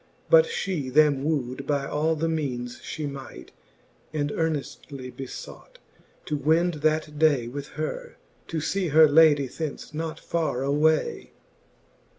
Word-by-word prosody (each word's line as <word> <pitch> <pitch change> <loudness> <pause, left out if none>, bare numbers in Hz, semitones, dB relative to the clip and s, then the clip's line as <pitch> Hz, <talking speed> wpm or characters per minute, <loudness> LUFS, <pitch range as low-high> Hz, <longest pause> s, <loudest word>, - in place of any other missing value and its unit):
But - - +8
fhe 185 - -3
them 145 -1 +4
woo'd 140 -3 -2
by 140 -2 0
all 155 +3 0
the 160 +1 -1
meanes 130 -7 -3
fhe 155 -2 -5
might, 140 -1 -9 0.6
And 145 -1 -1
earneftly 140 -4 -4
befought, 135 -2 -9 0.5
to 150 - -2
wend 165 +4 +2
that 155 -1 0
day 145 -7 +3
With 140 +3 -6
her, 475 - -4 0.3
to 160 -1 -3
lee 195 -2 0
her, 155 +1 +7
ladie 150 -2 +5
thence 150 +2 -6
not 160 +1 -4
farre 155 -6 -1
away. 160 - +1
150 Hz, 135 wpm, -26 LUFS, 140-160 Hz, 0.6 s, But